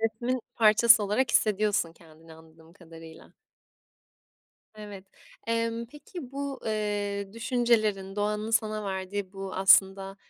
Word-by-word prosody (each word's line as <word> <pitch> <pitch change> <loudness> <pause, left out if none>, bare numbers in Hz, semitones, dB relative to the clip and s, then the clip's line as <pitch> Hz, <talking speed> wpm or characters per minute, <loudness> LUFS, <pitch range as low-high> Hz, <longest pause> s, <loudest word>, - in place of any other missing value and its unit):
resmin 235 +3 -2
parçası 225 0 +5
olarak 225 +4 0
hissediyorsun 210 -6 +1
kendini, 160 0 -18
anladığım 160 0 -19
kadarıyla. 165 -3 -14 1.4
Evet. 205 -3 -10 0.4
Emm, 230 0 -2
peki, 295 +1 -11
bu, 280 -1 -5
eee, 205 -2 -3
düşüncelerin 220 -5 0
doğanın 210 +1 -2
sana 215 -2 0
verdiği 190 0 -4
bu 195 -1 -7
aslında, 195 0 +3
210 Hz, 105 wpm, -27 LUFS, 190-230 Hz, 1.4 s, parçası